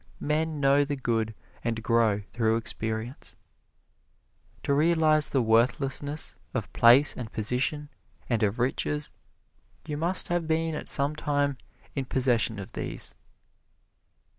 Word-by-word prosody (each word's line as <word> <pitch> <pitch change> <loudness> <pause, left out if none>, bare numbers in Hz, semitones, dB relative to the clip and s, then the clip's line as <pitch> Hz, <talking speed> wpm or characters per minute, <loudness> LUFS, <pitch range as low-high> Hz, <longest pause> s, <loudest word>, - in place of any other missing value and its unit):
Men 155 +1 -1
know 140 +1 +4
the 145 0 -3
good 115 -4 -1 0.3
and 115 -1 -2
grow 115 -3 +2
through 110 -1 +1
experience. 115 +2 -3 1.3
To 140 - +1
realize 155 0 +3
the 135 -3 +1
worthlessness 130 +6 0 0.2
of - - -4
place 125 +5 +6
and 120 -3 -7
position 130 +7 -1 0.4
and 115 -3 0
of 105 +1 +1
riches, 145 +4 -1 0.7
you 150 -2 -4
must 175 +4 +3
have 175 -2 -1
been 160 0 0
at 150 - -6
some 140 +2 +2
time 145 -3 -1 0.3
in 135 -2 -3
possession 120 -4 +1
of 100 -2 -8
these. - - -4
135 Hz, 125 wpm, -27 LUFS, 115-150 Hz, 1.3 s, place